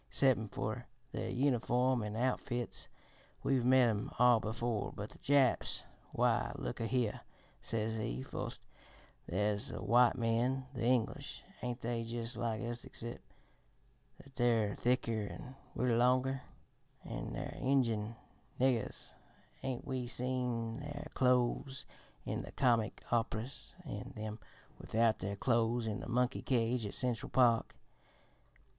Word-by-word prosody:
Excep' 120 -6 +2
fer - - -3 0.2
their - - -3
uniform 125 -1 +2
an' 105 0 -3
outfits, 120 -1 -1 0.6
we've 135 -3 +2
met 130 0 +6
'em 105 -2 0
all 125 -1 +6
before 110 0 -2
but 105 +1 -6
the - - -13
Japs. 140 -3 +3 0.3
Why, - - +2
look - - -4
a 115 - -1
here,' 120 -4 0 0.4
says 110 0 -2
he, 65 - -2
'foist, - - -4 0.7
there's 105 +2 +1
the - - -5
white 120 +3 +5
men 120 +3 +1
the 125 - -5
English 125 +3 0 0.2
ain't 125 0 -3
they 115 0 -1
jus' 115 +1 -3
like 115 0 -1
us 120 0 -1
excep' 120 +1 -5 1.0
that 140 - -18
they're 115 -5 +2
thicker 115 -4 +1
an' 130 +1 -9 0.2
we're 125 -2 +2
longer? 130 +2 +3 0.6
An' - - -5
their - - -4
Injun 115 -5 +2 0.4
niggers 125 -4 0 0.5
ain't 130 -2 -3
we 130 -2 -2
seen 125 -2 -1
their 145 0 -6
clothes 125 +1 +2 0.4
in - - -2
the - - -8
comic 115 -4 +2
op'ras 115 +2 -2
an' - - -6
them 110 0 -5 0.4
without 115 0 +2
their 100 +1 -3
clothes 115 +1 +2
in 110 +1 -2
the - - -7
monkey 125 0 +1
cage 120 -2 +1
at - - -6
Central 125 -4 -1
Park? 120 -3 +3
120 Hz, 135 wpm, -35 LUFS, 115-125 Hz, 1.0 s, met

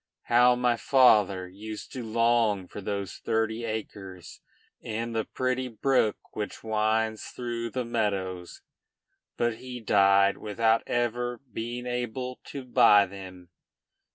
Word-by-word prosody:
How 125 +1 +5
my 125 -1 +1
father 105 -9 +4
used 105 +3 -9
to 130 -3 -5
long 115 -3 +1
for 105 - -8
those 100 -1 -4
thirty 110 +1 -1
acres 100 -5 -7 0.4
and 115 +1 -4
the 110 - 0
pretty 130 0 -2
brook 125 -1 +1 0.2
which 105 -1 -5
winds 110 0 0
through 120 -1 -4
the 125 +2 -3
meadows! 95 -6 -3 0.7
But 120 -1 0
he 125 0 -8
died 100 -2 +4
without 110 +2 +1
ever 120 0 -1
being 120 +3 -4
able 125 +1 -4
to 140 -2 -7
buy 105 -4 +6
them. 95 -2 -11
110 Hz, 125 wpm, -27 LUFS, 100-120 Hz, 0.7 s, buy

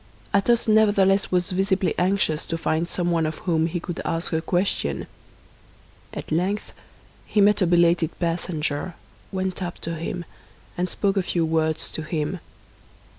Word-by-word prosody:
Athos 230 +4 +3
nevertheless 205 -2 +4
was 180 +1 +1
visibly 190 0 +1
anxious 180 -4 +1
to 165 - -3
find 165 +1 0
someone 170 -3 +1
of 155 - -4
whom 165 -3 +2
he 175 +1 -2
could 175 0 -5
ask 165 +1 -2
a 160 - +1
question. 175 - 0 1.1
At - - -7
length 190 +6 -1 0.5
he 215 - +1
met 205 +1 +5
a 185 - +4
belated 170 -1 +3
passenger, 165 -1 -2 0.4
went 190 -1 -2
up 175 -2 -4
to 165 - -3
him, 170 +2 -4 0.5
and 180 +1 -1
spoke 200 -1 0
a - - +4
few 175 -2 0
words 160 -1 0
to - - -4
him. 155 +2 -2
175 Hz, 150 wpm, -24 LUFS, 165-190 Hz, 1.1 s, met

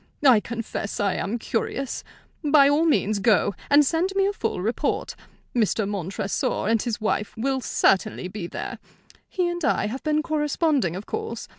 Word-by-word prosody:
I 250 -5 +7
confess 230 -2 -5
I 200 -2 +1
am 210 +6 -2
curious. 255 +3 -3 0.4
By 290 -2 +6
all 295 +3 +3
means 215 -10 +2
go, 205 -1 +3 0.2
and 290 0 +6
send 330 +6 +1
me 390 0 +3
a 400 - +1
full 400 - -2
report. 220 +6 -1 0.4
Mr. 220 -2 +1
Montresor 195 0 -2
and 225 -1 +2
his 235 -3 -2
wife 215 -1 -2
will 265 +3 0
certainly 195 -4 +1
be 185 -2 -6
there. - - -6 0.5
He 365 -2 0
and 345 -1 -3
I - - +2
have 240 +6 -4
been 305 0 +1
corresponding, 295 - +1
of 195 +3 -6
course. 440 0 -5
240 Hz, 165 wpm, -24 LUFS, 205-300 Hz, 0.5 s, I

